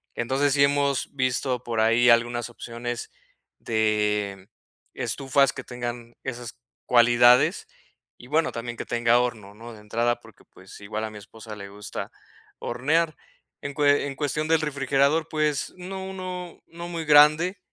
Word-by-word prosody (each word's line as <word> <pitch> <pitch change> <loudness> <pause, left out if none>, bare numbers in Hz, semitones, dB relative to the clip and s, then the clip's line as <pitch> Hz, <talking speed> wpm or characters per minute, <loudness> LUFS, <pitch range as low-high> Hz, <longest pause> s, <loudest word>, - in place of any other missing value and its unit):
entonces, 135 +4 +1
sí 140 -1 +4
hemos 140 -1 +1
visto 130 -1 -1
por 115 -2 -1
ahí 115 +2 +4
algunas 120 0 +2
opciones 120 0 -6 0.5
de 105 -3 0 0.5
estufas 135 0 +1
que 130 - -7
tengan 120 -1 -6
esas 120 -2 -6 0.3
cualidades, 120 0 +5 0.5
y - - -14
bueno, 155 +4 +1
también 120 0 -6
que - - -5
tenga 120 0 +3
horno, 110 -5 -3
¿no?, 115 +3 -11
de 105 - -13
entrada 115 +3 0
porque, - - -18
pues, - - -15
igual 110 +2 -4
a 110 - -6
mi 105 - -10
esposa 110 +1 -11
le 100 -1 -9
gusta 105 +1 -7 0.5
hornear, 155 +6 0 0.5
en 145 - -5
cue 145 -1 +3
en 140 - -6
cuestión 150 +2 -2
del 160 0 +3
refrigerador, 140 +1 +1
pues, 150 -2 0
uno 190 +1 -6
uno 185 -2 -7
no 170 +1 -9
muy 165 -2 -5
grande, 155 +6 +5
125 Hz, 150 wpm, -25 LUFS, 115-145 Hz, 0.5 s, cualidades